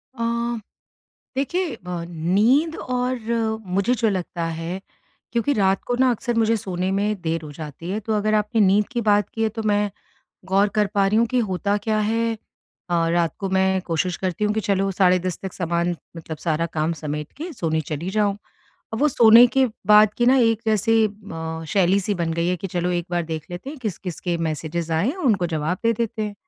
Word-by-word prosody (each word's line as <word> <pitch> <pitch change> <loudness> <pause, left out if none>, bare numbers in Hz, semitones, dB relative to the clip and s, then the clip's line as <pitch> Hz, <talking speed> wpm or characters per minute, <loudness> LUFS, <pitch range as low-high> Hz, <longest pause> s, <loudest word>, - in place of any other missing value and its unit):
अ, 230 - -3 1.1
देखिए 315 +1 -1
ब 175 -1 -4
नींद 210 - +2
और 250 0 -2 0.5
मुझे 195 +6 +1
जो 230 -2 +1
लगता 180 -3 -2
है 170 +3 -4 0.5
क्योंकि 235 +4 +1
रात 195 -5 +2
को 245 - 0
ना 260 -1 +5
अक्सर 240 +1 -1
मुझे 225 0 +3
सोने 185 -2 -2
में 205 0 0
देर 165 -1 -1
हो 150 - -8
जाती 155 +3 -7
है 205 - -1
तो 220 +1 -3
अगर 215 +1 +1
आपने 210 +1 +1
नींद 205 +1 +4
की 240 - 0
बात 205 -1 +3
की 225 - -2
है 220 - +3
तो 225 - -1
मैं 205 -1 +1 0.6
गौर 195 +2 +3
कर 210 -1 +3
पा 200 -1 +3
रही 210 - +2
हूँ 235 - +4
कि 250 +2 0
होता 200 +2 0
क्या 215 -1 +2
है 225 +2 +1 0.6
अ, 165 -1 +2
रात 170 -2 +1
को 195 - -3
मैं 190 0 +2
कोशिश 175 +1 -1
करती 185 +2 -2
हूँ 210 - +2
कि 220 - 0
चलो 195 0 +2
साढ़े 185 -1 +4
10 180 - -2
तक 190 -2 -5
सामान 170 0 -1 0.2
मतलब 160 -1 -7
सारा 165 +1 0
काम 155 +2 +1
समेट 150 0 -4
के 330 +5 -6
सोने 160 - -1
चली 155 +4 -4
जाऊँ। 205 -1 +1 0.6
और 220 - -2
वो 300 - +4
सोने 235 -2 +8
के 265 +2 +2 0.2
बाद 210 0 +6
की 240 - +3
ना 260 +2 +6
एक 225 -3 +3
जैसे 220 +1 +2 0.3
म 160 -2 -5
शैली-सी 195 +1 +2
बन 170 -3 -1
गई 170 +1 0
है 180 - +1
कि 195 - -5
चलो 175 -1 -1
एक 175 -1 -2
बार 175 -1 0
देख 160 -2 -5
लेते 180 +10 -6
हैं 305 - -9
किस-किस 185 -5 -4
के 175 -2 -1
मैसेजेस 165 +1 -3
आए 160 +4 +1
हैं 295 - -2
उनको 220 - +1
जवाब 160 +2 -2
दे 230 - +4
देते 230 0 -2
हैं। 210 -1 -4
195 Hz, 210 wpm, -22 LUFS, 170-225 Hz, 1.1 s, सोने